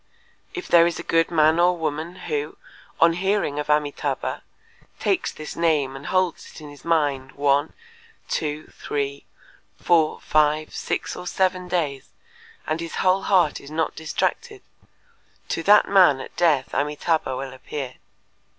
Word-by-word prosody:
If 365 - -5
there 170 -1 +6
is 170 - -2
a - - -6
good 165 0 +2
man 160 0 +3
or 175 +1 +4
woman 160 +2 -3
who, 150 -1 -3 0.4
on 165 0 +5
hearing 190 -4 0
of 150 - -3
Amitâbha, 150 -1 -1 0.6
takes 380 -2 0
this 155 0 -8
name 150 -5 +1
and 140 +2 -8
holds 185 -2 0
it - - -12
in 150 -1 -10
his 145 - -15
mind 145 -5 0
one, 145 +1 +1 0.5
two, 150 0 -2
three, 140 -1 -4 0.5
four, 160 -3 +2
five, 155 0 +1
six, - - -3
or 180 - -7
seven 185 -1 0
days, 155 -7 -2 0.6
and 155 - -2
his 165 0 -6
whole 190 +1 +2
heart 180 -7 +2
is 140 - -12
not 160 +1 -2
distracted, 385 - -3 0.9
to - - -1
that 205 +4 +6
man 180 -9 +5
at - - -9
death 155 -7 +2
Amitâbha 150 -1 0
will 135 0 -6
appear. 130 0 -7
155 Hz, 150 wpm, -23 LUFS, 145-175 Hz, 0.9 s, there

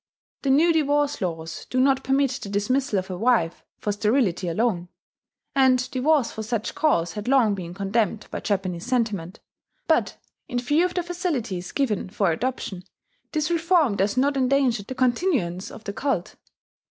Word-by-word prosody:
The 275 - -1
new 320 +5 +5
divorce 290 -2 +1
laws 165 -3 -4
do 255 - 0
not 265 0 +3
permit 270 0 +2
the 200 - -6
dismissal 220 +4 0
of 190 0 -3
a 180 - -4
wife 220 -8 +1
for 210 - -2
sterility 205 -3 +1
alone 180 -1 0 0.6
(and 260 -2 +4
divorce 275 0 +2
for 220 - -6
such 220 0 -2
cause 170 - +1
had 210 +1 -6
long 250 -6 +4
been 175 -3 -6
condemned 205 +2 0
by - - -3
Japanese 190 -2 -2
sentiment); 215 -8 -1 0.4
but, - - +1 0.3
in 245 - -3
view 290 +8 +2
of 360 - -3
the 355 - 0
facilities 280 - -3
given 220 -10 -1
for 195 -2 +1
adoption, 195 -2 -3 0.5
this 310 +1 -1
reform 335 - +3
does 200 +3 0
not 280 +2 +2
endanger 260 -3 +2
the 230 +6 -7
continuance 245 - 0
of 225 - -11
the 200 - -5
cult. 275 +6 -2
240 Hz, 165 wpm, -24 LUFS, 195-275 Hz, 0.6 s, new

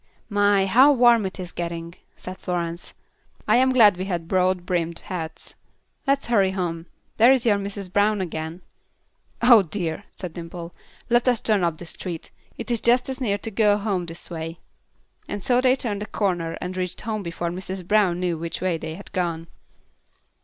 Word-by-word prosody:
"My! 205 -2 +3
how 255 +9 +6
warm 240 -5 +5
it 190 - -9
is 180 -1 -4
getting," 170 -1 -5 0.2
said 185 +1 -8
Florence. 170 -2 -4 0.5
"I - - +5
am 260 +1 +4
glad 215 -7 +6
we 185 - -3
have 175 -4 -3
broad 185 -1 +1
brimmed 170 -2 -1
hats. 160 -3 -6 0.5
Let's 275 0 +2
hurry 200 -5 +3
home. 170 -3 -3 0.3
There 235 +4 +7
is 265 -2 +3
your 210 -3 +4
Mrs. 200 -2 -6
Brown 205 +1 +3
again." 165 -1 -5 0.8
"Oh, 235 -3 +8
dear!" 175 +1 -4
said 180 -4 -7
Dimple. 170 0 -8 0.4
"Let 240 +1 +3
us 245 -3 +4
turn 210 -4 +2
up 170 -2 0
this 175 0 -7
street; 170 -4 -7 0.3
it 235 +1 -5
is 235 - 0
just 245 +2 +3
as 265 0 -5
near 205 -5 +1
to 225 - -6
go 205 -1 +3
home 200 -4 -2
this 165 +1 -8
way." 165 0 -5 0.8
So 245 +5 +2
they 255 0 +4
turned 210 -6 -3
the 210 - -4
corner 175 -7 -1
and 180 +1 -5
reached 180 -1 -3
home 215 -1 -3
before 170 -1 -4
Mrs. 185 0 -6
Brown 200 -4 +3
knew 175 -3 -1
which 165 0 -4
way 180 -2 -1
they 160 0 -6
had 200 - -12
gone. 170 -2 -2
185 Hz, 180 wpm, -24 LUFS, 170-215 Hz, 0.8 s, Oh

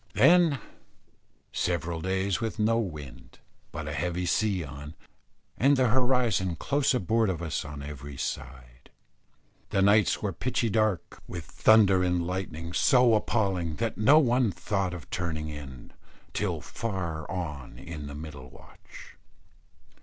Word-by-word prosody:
Then 170 -4 +5 0.9
several 85 -1 -1
days 95 0 -1
with 110 -1 -3
no 115 +1 +2
wind, 75 - -7 0.3
but - - -6
a - - -3
heavy 90 +1 -2
sea 95 0 +1
on, 75 +2 -9 0.6
and 140 +2 +4
the 130 -2 +3
horizon 120 -7 +2
close 140 - +1
aboard 110 0 +1
of 90 - -2
us 80 - -2
on 75 -1 -8
every 70 -1 -8
side. 60 -2 -6 0.8
The 95 - +2
nights 105 +1 +4
were 100 -3 -2
pitchy 115 +3 -1
dark, 110 -4 0
with 85 -3 -6
thunder 100 -4 +5
and 90 -1 +1
lightning 85 -2 -4
so 125 +2 +5
appalling 95 -7 0
that 115 +3 -2
no 135 +8 +5
one 125 -5 +3
thought 95 -2 -2
of 80 -6 -10
turning 80 -3 -3
in, 70 -4 -9 0.4
till - - -1
far 85 -9 -4
on 75 -7 -5
in 75 -4 -7
the 70 - -7
middle 75 -4 -9
watch. - - -15
90 Hz, 140 wpm, -28 LUFS, 80-110 Hz, 0.9 s, Then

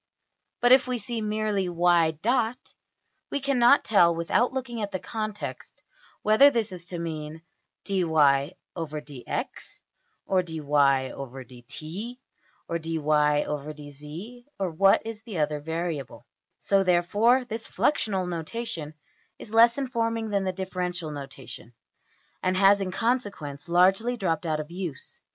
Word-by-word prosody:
But 245 - +4
if 260 0 +6
we 250 -1 -1
see 230 +1 -4
merely~$\dot{y}$, 200 - +1 0.7
we 285 - -1
cannot 275 -1 +4
tell 170 -6 +5
without 170 +9 +1
looking 250 -3 -4
at 205 - -2
the 190 - -1
context 215 0 -6 0.4
whether 220 +7 +7
this 230 -6 -1
is 175 -2 -7
to 175 - -5
mean 160 -1 -5 0.4
$\dfrac{dy}{dx}$ 160 -5 +2 0.2
or 150 +4 -5
$\dfrac{dy}{dt}$ 140 - -2 0.5
or~$\dfrac{dy}{dz}$, 150 - -2
or 190 -3 -1
what 195 +6 +4
is 225 -1 -6
the 220 -5 -7
other 150 -1 0
variable. 160 -2 -4 0.3
So, 195 -1 +2
therefore, 205 +8 +3
this 225 -1 -5
fluxional 195 -10 0
notation 165 -2 -5 0.4
is 215 - -11
less 235 +2 +6
informing 230 -4 -1
than 200 -2 0
the 185 - 0
differential 180 -3 -4
notation, 135 -4 -9 0.7
and 185 0 +1
has 200 +1 +5
in 190 - -2
consequence 195 - -2
largely 195 +8 +3
dropped 170 -5 -1
out 155 -1 0
of 155 +2 -6
use. 175 -6 -6
180 Hz, 115 wpm, -26 LUFS, 155-220 Hz, 0.7 s, whether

